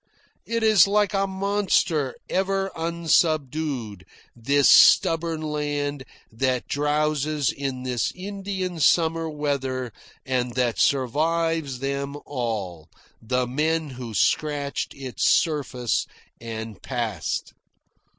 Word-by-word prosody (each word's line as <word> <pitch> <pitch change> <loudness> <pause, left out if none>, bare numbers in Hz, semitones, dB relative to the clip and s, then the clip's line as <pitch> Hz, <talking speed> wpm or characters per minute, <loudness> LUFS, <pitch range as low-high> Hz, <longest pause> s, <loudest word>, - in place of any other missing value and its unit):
It 230 0 -1
is 215 -5 +6
like 205 0 +2
a 195 0 +1
monster 190 -8 0
ever 195 0 0
unsubdued, 155 - 0 0.3
this 140 +4 +2
stubborn 165 -1 +5
land 145 -2 -2 0.3
that 125 +2 -1
drowses 150 -1 0
in 135 -2 -4
this 125 -2 -1
Indian 190 -2 -4
summer 165 +1 +3
weather 135 -5 -2 0.3
and 125 -2 -1
that 125 -2 0
survives 155 +2 +1
them 140 +2 -3
all, 105 - -4 0.3
the 125 +2 0
men 155 +4 -1
who 120 -3 -7
scratched 145 - 0
its 130 -3 0
surface 135 -7 -1 0.3
and 110 -3 -7
passed. 115 -9 -3
145 Hz, 100 wpm, -24 LUFS, 125-165 Hz, 0.3 s, is